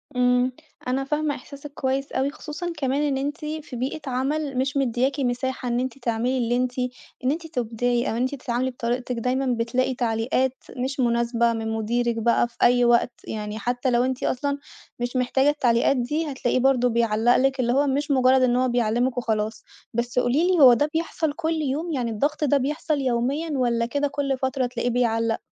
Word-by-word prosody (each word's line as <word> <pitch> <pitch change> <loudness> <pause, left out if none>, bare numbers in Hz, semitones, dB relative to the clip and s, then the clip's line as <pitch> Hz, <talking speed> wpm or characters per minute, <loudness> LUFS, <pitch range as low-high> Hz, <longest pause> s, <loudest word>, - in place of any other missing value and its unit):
امم، 250 0 +3 0.4
أنا 265 +2 0
فاهمة 300 +1 -1
إحساسِك 280 +3 -11
كويس 270 0 -2
أوي، 270 +1 0
خصوصًا 320 +4 -6
كمان 275 0 0
إن 285 -2 0
أنتِ 285 +3 -2
في 305 -3 -5
بيئة 260 +6 -3
عمل 275 +2 -1
مش 265 +2 0
مديّاكِ 265 +2 0
مساحة 255 0 -2
إن 240 0 0
أنتِ 255 0 -3
تعملي 240 +1 -1
اللّي 240 -1 +1
أنتِ 250 0 -1 0.4
إن 255 - +2
أنتِ 325 +2 -4
تُبدعي، 240 -3 -1
أو 225 - -2
أنتِ 260 +4 0
تتعاملي 255 0 -2
بطريقتِك، 245 0 -2
دايمًا 255 +3 0
بتلاقي 255 +3 0
تعليقات 245 +2 0 0.2
مش 265 +3 -3
مناسبة 235 -1 +2
من 225 0 -3
مديرِك 235 +2 0
بقى 235 +1 +2
في 235 - -25
أي 245 0 +5
وقت، 240 +1 +3 0.2
يعني 210 0 -4
حتى 245 +2 -1
لو 240 0 +3
أنتِ 260 0 -2
أصلًا 280 +2 -1 0.4
مش 245 +1 -3
محتاجة 265 +2 +2
التعليقات 260 -2 +2
دي، 295 +5 -1
هتلاقيه 255 -1 0
برضه 250 -1 +3
بيعلّق 230 0 +2
لِك، 270 +1 +1
اللّي 240 -1 +2
هو 280 +2 +3
مش 285 +2 0
مجرد 260 -1 +4
إن 250 -1 +3
هو 255 +1 +2
بيعلّمِك 240 +1 +1
وخلاص. 220 -2 -1 0.3
بس 240 +2 0
قولي 270 +8 +2
لي، 365 -3 +2
هو 255 -3 +9
ده 290 +5 +1
بيحصل 320 -2 -1
كُلّ 320 0 -1
يوم؟ 300 +4 -2
يعني 245 -4 -1
الضغط 295 +8 -1
ده 285 -1 +3
بيحصل 295 +2 -1
يوميًا 265 +6 0
والَّا 240 -3 +1
كده 285 +4 0
كُلّ 280 -2 -1
فترة 265 -1 -1
تلاقيه 245 0 -2
بيعلّق؟ 230 -2 +1
255 Hz, 185 wpm, -24 LUFS, 240-275 Hz, 0.4 s, هو